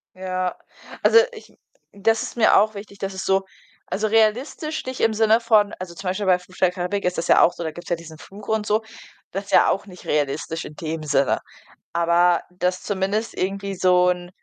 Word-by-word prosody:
Ja, 185 -1 -3 0.5
also, 460 - +5
ich 450 - -14 0.4
das 225 +3 +1
ist - - -7
mir 220 - +5
auch 215 +2 +3
wichtig, 200 0 -10
dass 195 -1 -4
es 190 - -5
so 195 0 +2 0.4
also, 215 +2 -1
realistisch 240 +9 0
nicht 260 0 -5
im 225 -1 +3
Sinne 220 +1 +4
von 215 -3 +3
also, 180 -2 -7
zum 190 +2 -8
Beispiel 195 +2 -2
bei 180 -1 +4
„Fluch 185 +1 -18
der 185 -1 +3
Karibik“ 180 +2 -3
ist 180 0 0
das - - -3
ja - - +6
auch 175 - +5
so, - - -6
da 160 - -3
gibt's 175 +2 -11
ja 175 - +2
diesen 160 -1 -12
Fluch 200 +5 -13
und 220 -1 0
so, 215 +2 +1 0.5
das 195 +2 -4
ist - - -11
ja - - +6
auch 195 - -1
nicht 180 -3 -13
realistisch 150 +3 -1
in 150 - -10
dem 160 0 -5
Sinne. 140 -2 +1 0.5
Aber, 170 +1 +3
dass 180 0 -2
zumindest 205 +3 -1
irgendwie 195 +1 -2
so 180 0 +4
'n, 180 0 -2
190 Hz, 210 wpm, -22 LUFS, 175-210 Hz, 0.5 s, ja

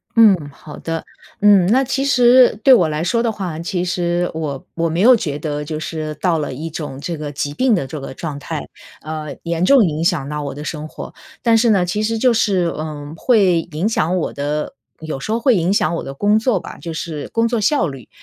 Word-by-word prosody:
嗯， 220 -4 +7 0.2
好 150 +1 -12
的。 165 -1 -4 0.4
嗯， 200 -4 +6
那 260 +6 +3
其 270 +1 -1
实 250 -3 +5
对 265 - +8
我 175 -9 +5
来 155 +2 -2
说 230 +6 +1
的 230 -2 0
话， 180 -6 -5
其 180 +1 -2
实 175 0 -1
我 150 -4 -4
我 165 0 -1
没 170 +4 -1
有 250 +3 +7
觉 150 -9 -3
得 150 -1 -3
就 155 0 -5
是 155 -1 -5
到 170 -1 0
了 145 - -3
一 160 +5 -5
种 145 -4 -6
这 165 +2 -4
个 150 -1 -5
疾 145 0 -3
病 250 - +2
的 140 - -1
这 145 +3 -7
个 135 - -7
状 150 -4 -5
态， 155 0 -5 0.4
呃， 155 -2 -5
严 170 0 -1
重 260 +2 +6
影 160 0 -2
响 155 -6 +1
到 150 0 -4
我 140 -1 -5
的 150 - -7
生 155 0 -5
活。 - - -9 0.3
但 230 -2 +4
是 230 +1 +3
呢， 190 -4 +3
其 210 +5 -2
实 225 +1 0
就 245 +1 +3
是， 195 -5 +2
呃， 150 -1 -6
会 190 -5 +3
影 165 +8 -1
响 185 -4 0
我 170 - -2
的 150 - -3 0.3
有 155 -4 -5
时 215 - -5
候 230 - +1
会 245 -1 +3
影 175 +1 +1
响 170 -4 +1
我 - - -4
的 135 - -6
工 210 +6 +2
作 225 -5 +1
吧， - - -10
就 165 -1 -5
是 155 -2 -5
工 230 0 +1
作 235 -1 -1
效 205 - +2
率。 135 -5 -9
170 Hz, 250 characters per minute, -19 LUFS, 150-215 Hz, 0.4 s, 对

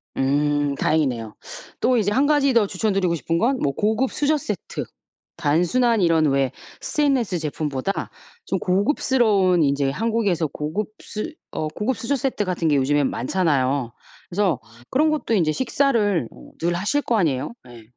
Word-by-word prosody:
음 145 +1 +1
다행이네요. 125 -9 0 0.5
또 255 -1 +3
이제 205 -2 +1
1 270 +6 +3
가지 285 -3 +3
더 225 -3 +4
추천드리고 190 -3 0
싶은 165 +3 -1
건 255 +7 +2
뭐 140 -1 +1
고급 220 - 0
수저 300 +1 +1
세트. 305 - -5 0.5
단순한 180 +9 +2
이런 165 -2 +3
왜 135 -2 +1 0.3
스테인리스 265 - +1
제품보다 150 +2 -3 0.4
좀 190 - -1
고급스러운 200 - +2
인제 140 -1 +2
한국에서 205 -4 0
고급 155 +10 -4
수 220 +10 -5 0.2
어 155 - -2
고급 215 +10 -2
수저 275 +6 -1
세트 255 -5 -1
같은 175 -3 -1
게 150 - +3
요즘에 145 +2 +2
많잖아요. 135 -4 0 0.4
그래서 185 - +1 0.3
그런 305 +3 +2
것도 290 -7 0
이제 160 -5 +2
식사를 225 - +1 0.3
늘 175 +1 0
하실 205 +12 0
거 230 - +1
아니에요. 150 - 0 0.2
예. 115 -2 -12
185 Hz, 315 characters per minute, -22 LUFS, 145-230 Hz, 0.5 s, 더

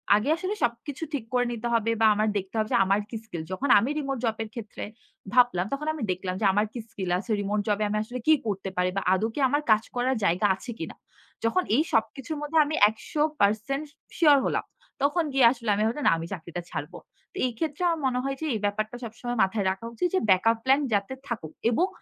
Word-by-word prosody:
আগে 215 +8 0
আসলে 375 +4 -2
সবকিছু 240 +6 -2
ঠিক 270 -6 -2
করে 245 0 +3
নিতে 235 0 -3
হবে 230 0 +2
বা - - +6
আমার 215 +1 +1
দেখতে 190 +2 -5
হবে 215 0 0
যে - - +5
আমার 195 +2 +2
কি 230 - -7
স্কিল। 170 -7 -6
যখন 265 +9 -2
আমি 240 +7 -1
রিমোট 275 -2 -2
জবের 225 -1 -2
ক্ষেত্রে 225 -3 -7 0.5
ভাবলাম 245 -8 +4
তখন 300 +2 -3
আমি 295 -7 -5
দেখলাম 185 0 -3
যে 210 - +2
আমার 210 +2 +2
কি 240 - -5
স্কিল 190 -4 -5
আছে। 220 +3 -6
রিমোট 205 +1 -1
জবে 210 0 +1
আমি 210 - 0
আসলে 245 +3 -6
কি 315 - +8
করতে 195 -2 -2
পারি 180 0 +2
বা 195 - +1
আদৌ 190 +4 +1
কি - - -3
আমার 290 +3 +1
কাজ 215 0 +5
করার 255 +2 +1
জায়গা 185 +3 +3
আছে 240 +6 -8
কিনা? - - -6 0.5
যখন 360 +11 +2
এই 295 - +4
সবকিছুর 270 +7 -1
মধ্যে 295 +2 -1
আমি 305 - -2
১০০% 275 +1 0 0.3
শিওর 300 -4 +6
হলাম। - - 0 0.4
তখন 295 +5 +2
গিয়ে 265 -3 +5
আসলে 235 -3 -4
আমি 210 - +1
ভাবলাম 265 +6 -2
না - - +6
আমি 165 0 -5
চাকরিটা 175 -1 -6
ছাড়ব। - - -5 0.4
তো - - -28
এই 250 - 0
ক্ষেত্রে 315 +1 -2
আমার 330 -1 0
মনে 250 -1 0
হয় 275 0 -2
যে 315 - -2
এই 220 - -1
ব্যাপারটা 215 +3 -2
সবসময় 240 +1 -5
মাথায় 195 +1 0
রাখা 190 +4 -6
উচিত 355 - 0
যে - - +4
ব্যাকআপ 225 +5 +4
প্ল্যান 270 +2 +4
যাতে 200 +5 0
থাকুক 180 -10 -5 0.2
এবং 340 +11 +2
230 Hz, 220 wpm, -26 LUFS, 205-275 Hz, 0.5 s, কি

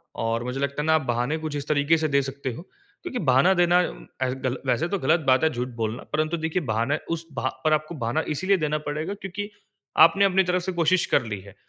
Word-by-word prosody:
और 115 +1 -1
मुझे 125 +2 -4
लगता 140 +1 -1
है - - -3
ना, 160 0 +4
आप 160 - +2
बहाने 125 +3 -1
कुछ 155 -2 -5
इस 145 0 -4
तरीके 150 +2 +3
से 160 0 0
दे 140 -1 +2
सकते 135 0 -4
हो, 120 - -8 0.4
क्योंकि 310 -9 -4
बहाना 135 +5 +4
देना, 175 -1 +4
उम, - - -12 0.2
एस 125 -1 0
गल 130 0 -1
वैसे 130 +7 +1
तो 200 - -1
ग़लत 170 - +3
बात 130 +1 +4
है 160 - +5
झूठ 125 +1 -2
बोलना, 110 +1 -2
परंतु 155 +2 0
देखिए, 160 +2 -1
बहाने 115 +7 +1
उस 165 0 -2
बहा 130 - -1
पर 155 - +3
आपको 155 +2 -1
बहाना 120 +3 -1
इसलिए 190 +5 +2
देना 150 -2 0
पड़ेगा 155 +6 -3
क्योंकि 205 +1 -6 0.6
आपने 195 +4 +3
अपनी 190 0 +3
तरफ 180 0 0
से 190 - -2
कोशिश 175 0 +2
कर 140 - +2
ली 105 -3 -4
है 95 0 -14
155 Hz, 240 wpm, -25 LUFS, 130-170 Hz, 0.6 s, है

